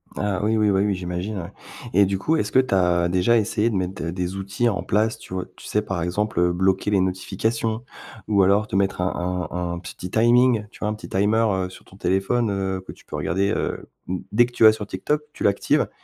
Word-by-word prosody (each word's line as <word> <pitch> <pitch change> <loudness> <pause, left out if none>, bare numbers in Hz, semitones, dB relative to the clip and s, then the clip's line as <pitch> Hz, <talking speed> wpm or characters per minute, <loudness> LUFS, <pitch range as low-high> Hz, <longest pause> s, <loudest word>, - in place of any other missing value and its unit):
Ah, 100 -3 -1
oui, 110 +1 +2
oui, 105 -1 +3
bah, 95 -1 +2
oui, 100 -1 +2
j'imagine, 90 +3 -4
ouais. 85 +3 -7 0.4
Et 100 0 +6
du 95 0 -1
coup, 160 +10 +1
est-ce - - -1
que 130 - +5
tu 130 -5 +2
as 90 -2 +3
déjà 90 +6 +3
essayé 110 +1 +1
de - - -2
mettre, 95 -1 -2
heu, 85 - -2
des 90 +1 -3
outils 100 +5 0
en 100 - -2
place, 110 +2 +1
tu - - -12
vois 90 -1 -2
tu - - -14
sais 105 - 0
par 95 -5 -3
exemple, 95 +2 -1
heu, 90 0 +3
bloquer 95 +3 +1
les 100 - +3
notifications 110 +5 -1 0.4
ou 100 -2 +4
alors 100 +3 +3
te - - -4
mettre 95 -2 +1
un 90 -1 -2
un 90 -1 -3
un 85 - -5
petit 90 +1 -8
timing? 120 -1 +4
Tu - - -17
vois 105 - -1
un - - -1
petit 105 - -9
timer, 105 +4 +2 0.2
heu, - - -6
sur 95 - -14
ton 95 - -17
téléphone, 100 +4 +1
heu, 95 -1 -2
que - - -7
tu - - -18
peux - - -7
regarder. 95 +5 0
Heu, - - -3 0.2
mmh, 90 +1 -2 0.2
dès 120 +2 +6
que 120 - -10
tu 115 - 0
vas 110 - +10
sur 110 -1 -5
TikTok, 150 +11 -2
tu - - -6
l'actives 100 0 +2
100 Hz, 245 wpm, -23 LUFS, 90-110 Hz, 0.4 s, vas